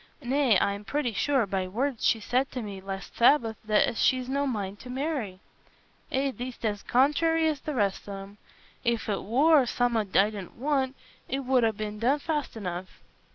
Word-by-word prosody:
Nay, 255 Hz, -3 st, +3 dB
I'm 200 Hz, +1 st, -1 dB
pretty 255 Hz, 0 st, -1 dB
sure, 265 Hz, +3 st, +2 dB
by 190 Hz, -1 st, -2 dB
words 245 Hz, +5 st, -2 dB
she 225 Hz, -, +3 dB
said 250 Hz, +5 st, 0 dB
to 250 Hz, -2 st, -3 dB
me 200 Hz, -2 st, -7 dB
last 195 Hz, 0 st, -7 dB
Sabbath, 235 Hz, -3 st, +4 dB
as 215 Hz, +2 st, +3 dB
she's 255 Hz, -1 st, +2 dB
no 280 Hz, +2 st, 0 dB
mind 205 Hz, -5 st, -3 dB
to 250 Hz, -, -11 dB
marry." 255 Hz, -, -3 dB, 0.7 s
"Eh, 270 Hz, +1 st, +1 dB
thee't 250 Hz, -2 st, -6 dB
as 205 Hz, -2 st, -1 dB
contrairy 320 Hz, +5 st, +3 dB
as 305 Hz, -3 st, 0 dB
the 300 Hz, -, -4 dB
rest 205 Hz, -3 st, -1 dB
on 195 Hz, -1 st, -5 dB
'em. 200 Hz, +1 st, -14 dB, 0.5 s
If 235 Hz, -2 st, 0 dB
it 205 Hz, -2 st, -1 dB
war 280 Hz, +7 st, +4 dB
summat 230 Hz, -5 st, 0 dB
I 205 Hz, +2 st, +5 dB
didna 200 Hz, -4 st, -8 dB
want, 270 Hz, 0 st, 0 dB, 0.3 s
it 270 Hz, +2 st, -1 dB
'ud 235 Hz, -5 st, +3 dB
be 215 Hz, -1 st, -3 dB
done 235 Hz, +7 st, +1 dB
fast 295 Hz, -5 st, -3 dB
enough." 185 Hz, -2 st, -6 dB
240 Hz, 180 wpm, -27 LUFS, 205-275 Hz, 0.7 s, I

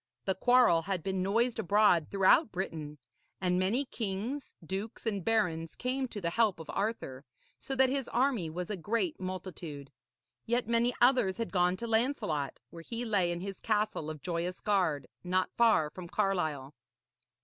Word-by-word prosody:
The 190 Hz, -, +2 dB
quarrel 245 Hz, -4 st, +4 dB
had 180 Hz, -1 st, -3 dB
been 190 Hz, -1 st, -1 dB
noised 230 Hz, +6 st, +1 dB
abroad 190 Hz, -4 st, +4 dB
throughout 200 Hz, -, +4 dB
Britain, 160 Hz, -5 st, -4 dB, 0.4 s
and 180 Hz, 0 st, +1 dB
many 220 Hz, +10 st, +1 dB
kings, 230 Hz, +5 st, -4 dB
dukes 195 Hz, +8 st, -5 dB
and 200 Hz, -5 st, -1 dB
barons 165 Hz, -8 st, 0 dB
came 260 Hz, +1 st, -2 dB
to 215 Hz, -, -7 dB
the 170 Hz, -3 st, -1 dB
help 215 Hz, -2 st, +2 dB
of 160 Hz, -, -7 dB
Arthur, 195 Hz, -, -3 dB, 0.4 s
so 270 Hz, -, -4 dB
that 265 Hz, 0 st, +5 dB
his 270 Hz, -1 st, -1 dB
army 240 Hz, -, +1 dB
was 180 Hz, +4 st, -5 dB
a -, -, -1 dB
great 230 Hz, -, -1 dB
multitude. 180 Hz, -6 st, -6 dB, 0.6 s
Yet 240 Hz, 0 st, +1 dB
many 235 Hz, +1 st, +3 dB
others 245 Hz, -7 st, +4 dB
had 230 Hz, -1 st, -3 dB
gone 180 Hz, -1 st, +2 dB
to 235 Hz, -, -5 dB
Lancelot, 225 Hz, -, 0 dB
where 170 Hz, -, -9 dB
he 235 Hz, +7 st, -4 dB
lay 195 Hz, -6 st, +2 dB
in 175 Hz, 0 st, -4 dB
his 195 Hz, 0 st, -6 dB
castle 210 Hz, -7 st, 0 dB
of 155 Hz, -2 st, -7 dB
Joyous 175 Hz, +1 st, -2 dB
Gard, 175 Hz, -10 st, +1 dB, 0.2 s
not 185 Hz, +1 st, 0 dB
far 220 Hz, -10 st, +4 dB
from 180 Hz, 0 st, -8 dB
Carlisle. 155 Hz, -8 st, -1 dB
195 Hz, 165 wpm, -31 LUFS, 170-230 Hz, 0.6 s, that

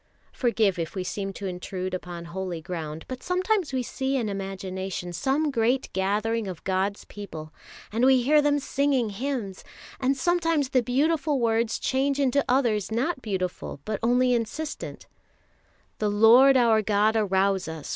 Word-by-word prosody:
Forgive 220 Hz, -7 st, +1 dB
if 165 Hz, +2 st, -4 dB
we 185 Hz, -, -2 dB
seem 195 Hz, +2 st, -4 dB
to 200 Hz, -, -7 dB
intrude 185 Hz, 0 st, -4 dB
upon 175 Hz, -2 st, -6 dB
holy 175 Hz, 0 st, -4 dB
ground, 160 Hz, -2 st, -6 dB
but 255 Hz, -1 st, -6 dB
sometimes 365 Hz, -2 st, 0 dB
we 260 Hz, -1 st, -1 dB
see 265 Hz, +2 st, -2 dB
in 230 Hz, -5 st, -1 dB
imagination 190 Hz, -2 st, -5 dB
some 280 Hz, -, 0 dB
great 245 Hz, +2 st, 0 dB
gathering 210 Hz, +3 st, 0 dB
of 180 Hz, -4 st, -7 dB
God's 195 Hz, +2 st, -1 dB
people, 160 Hz, -7 st, -9 dB, 0.4 s
and 225 Hz, +3 st, 0 dB
we 260 Hz, -1 st, +5 dB
hear 300 Hz, +4 st, +5 dB
them 290 Hz, 0 st, +2 dB
singing 275 Hz, -5 st, 0 dB
hymns; 225 Hz, -4 st, -4 dB, 0.4 s
and 265 Hz, +1 st, +1 dB
sometimes 330 Hz, -2 st, +1 dB
the 260 Hz, -2 st, +3 dB
beautiful 290 Hz, +4 st, +1 dB
words 225 Hz, -1 st, +1 dB
change 275 Hz, +1 st, 0 dB
into 280 Hz, 0 st, +2 dB
others 230 Hz, -6 st, +1 dB
not 260 Hz, +6 st, -1 dB
beautiful, 185 Hz, -, -4 dB
but 215 Hz, -2 st, -2 dB
only 250 Hz, +2 st, +3 dB
insistent: 245 Hz, +7 st, -4 dB, 0.9 s
The 210 Hz, -, +1 dB
Lord 235 Hz, +6 st, +6 dB
our 230 Hz, -3 st, +4 dB
God 210 Hz, +1 st, +2 dB
arouse 195 Hz, -3 st, +1 dB
us! 160 Hz, -2 st, -7 dB
225 Hz, 155 wpm, -26 LUFS, 190-265 Hz, 0.9 s, Lord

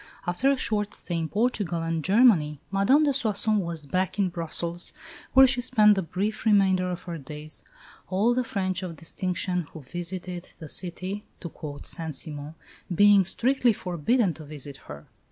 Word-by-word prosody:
After 180 Hz, +10 st, +2 dB
a 275 Hz, -, +3 dB
short 210 Hz, -4 st, -1 dB
stay 175 Hz, -, -4 dB
in 160 Hz, -1 st, -3 dB
Portugal 205 Hz, -6 st, 0 dB
and 165 Hz, -1 st, -2 dB
Germany, 190 Hz, -, +4 dB
Madame 200 Hz, +10 st, +4 dB
de 285 Hz, -2 st, +2 dB
Soissons 215 Hz, -4 st, +1 dB
was 170 Hz, -4 st, -2 dB
back 185 Hz, +7 st, -1 dB
in 195 Hz, -2 st, +2 dB
Brussels, 170 Hz, 0 st, -1 dB, 0.4 s
where 265 Hz, 0 st, +9 dB
she 255 Hz, -1 st, +1 dB
spent 215 Hz, -4 st, +5 dB
the 195 Hz, -, 0 dB
brief 195 Hz, +5 st, -3 dB
remainder 190 Hz, -4 st, +3 dB
of 180 Hz, -1 st, -5 dB
her 170 Hz, -2 st, -6 dB
days 150 Hz, +2 st, -8 dB, 0.5 s
"all 205 Hz, +6 st, +2 dB
the 255 Hz, +1 st, +1 dB
French 190 Hz, -5 st, -2 dB
of 180 Hz, -3 st, -5 dB
distinction 180 Hz, +2 st, -3 dB
who 160 Hz, -, -8 dB
visited 175 Hz, +4 st, -6 dB
the 155 Hz, -, -9 dB
City" 185 Hz, +4 st, -4 dB, 0.2 s
(to 170 Hz, -, -6 dB
quote 145 Hz, -3 st, -8 dB
Saint 160 Hz, -3 st, -4 dB
Simon) 150 Hz, 0 st, -6 dB, 0.4 s
"being 200 Hz, +2 st, +6 dB
strictly 245 Hz, +4 st, +2 dB
forbidden 185 Hz, -, 0 dB
to 155 Hz, -, -10 dB
visit 145 Hz, -2 st, -7 dB
her." 75 Hz, 0 st, -9 dB
185 Hz, 170 wpm, -26 LUFS, 165-210 Hz, 0.5 s, where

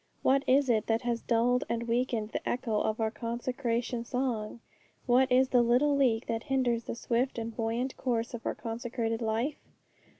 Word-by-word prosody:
What 275 Hz, +1 st, +3 dB
is 275 Hz, +1 st, +4 dB
it 220 Hz, -3 st, +1 dB
that 225 Hz, +2 st, +1 dB
has 235 Hz, -1 st, -1 dB
dulled 245 Hz, +2 st, +2 dB
and 235 Hz, 0 st, -2 dB
weakened 235 Hz, -2 st, 0 dB
the -, -, -3 dB
echo 230 Hz, -3 st, 0 dB
of 215 Hz, +1 st, -1 dB
our 220 Hz, -1 st, 0 dB
consecration 235 Hz, 0 st, -2 dB
song? 235 Hz, -3 st, -2 dB, 0.5 s
what 255 Hz, +2 st, +3 dB
is 255 Hz, +1 st, +4 dB
the 250 Hz, -2 st, +4 dB
little 250 Hz, +5 st, +3 dB
leak 245 Hz, -5 st, +2 dB
that 225 Hz, -1 st, -2 dB
hinders 250 Hz, -4 st, 0 dB
the -, -, -4 dB
swift 240 Hz, +2 st, -1 dB
and 230 Hz, -1 st, -4 dB
buoyant 235 Hz, +3 st, -2 dB
course 235 Hz, -2 st, -1 dB
of 235 Hz, -, -6 dB
our -, -, -2 dB
consecrated 230 Hz, 0 st, -3 dB
life? 230 Hz, +6 st, -1 dB
235 Hz, 175 wpm, -30 LUFS, 230-255 Hz, 0.5 s, is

